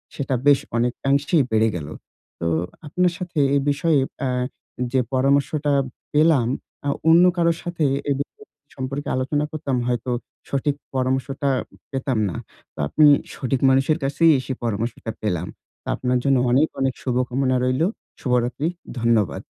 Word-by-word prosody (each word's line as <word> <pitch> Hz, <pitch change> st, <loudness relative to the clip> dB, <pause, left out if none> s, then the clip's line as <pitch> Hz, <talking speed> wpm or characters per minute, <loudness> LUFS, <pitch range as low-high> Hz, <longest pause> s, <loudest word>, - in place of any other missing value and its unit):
সেটা 135 Hz, -2 st, -1 dB
বেশ 145 Hz, -1 st, +6 dB, 0.2 s
অনেকাংশেই 140 Hz, +5 st, +2 dB
বেড়ে 110 Hz, 0 st, +4 dB
গেল। 75 Hz, -4 st, -5 dB, 0.5 s
তো -, -, -3 dB, 0.4 s
আপনার 180 Hz, +4 st, +2 dB
সাথে 175 Hz, -3 st, -4 dB, 0.2 s
এই 140 Hz, -, +3 dB
বিষয়ে 145 Hz, +1 st, +2 dB, 0.2 s
অ্যা 135 Hz, -, -1 dB, 0.6 s
যে, 130 Hz, -, +3 dB
পরামর্শটা 140 Hz, +3 st, +2 dB, 0.4 s
পেলাম, 150 Hz, -5 st, +4 dB, 0.4 s
আ -, -, +2 dB, 0.2 s
অন্য 170 Hz, +2 st, +7 dB
কারোর 170 Hz, -1 st, +2 dB
সাথে 170 Hz, -3 st, -1 dB, 0.2 s
এ -, -, +3 dB
বিষয় 140 Hz, -, -3 dB, 0.5 s
সম্পর্কে 135 Hz, +2 st, -4 dB
আলোচনা 145 Hz, +3 st, 0 dB
করতাম। 140 Hz, -4 st, -2 dB
হয়তো 125 Hz, 0 st, -1 dB, 0.4 s
সঠিক 140 Hz, +1 st, 0 dB, 0.2 s
পরামর্শটা 130 Hz, +2 st, 0 dB, 0.4 s
পেতাম 135 Hz, -2 st, -1 dB
না। 85 Hz, -, -6 dB, 0.4 s
তো -, -, -15 dB
আপনি 155 Hz, -, +4 dB, 0.3 s
সঠিক 130 Hz, -1 st, -1 dB
মানুষের 135 Hz, +3 st, +3 dB
কাছেই 155 Hz, +4 st, +4 dB
এসে 130 Hz, +1 st, -4 dB
পরামর্শটা 115 Hz, 0 st, -2 dB
পেলাম। 90 Hz, -5 st, -1 dB, 0.4 s
তো -, -, -18 dB
আপনার 125 Hz, 0 st, 0 dB
জন্য 135 Hz, -2 st, +3 dB
অনেক, 140 Hz, +5 st, +4 dB
অনেক 135 Hz, -1 st, +1 dB
শুভকামনা 130 Hz, +1 st, 0 dB
রইলো। 130 Hz, +7 st, +2 dB, 0.3 s
শুভরাত্রি। 125 Hz, +3 st, 0 dB, 0.3 s
ধন্যবাদ। 115 Hz, -4 st, +1 dB
135 Hz, 140 wpm, -22 LUFS, 125-145 Hz, 0.6 s, অন্য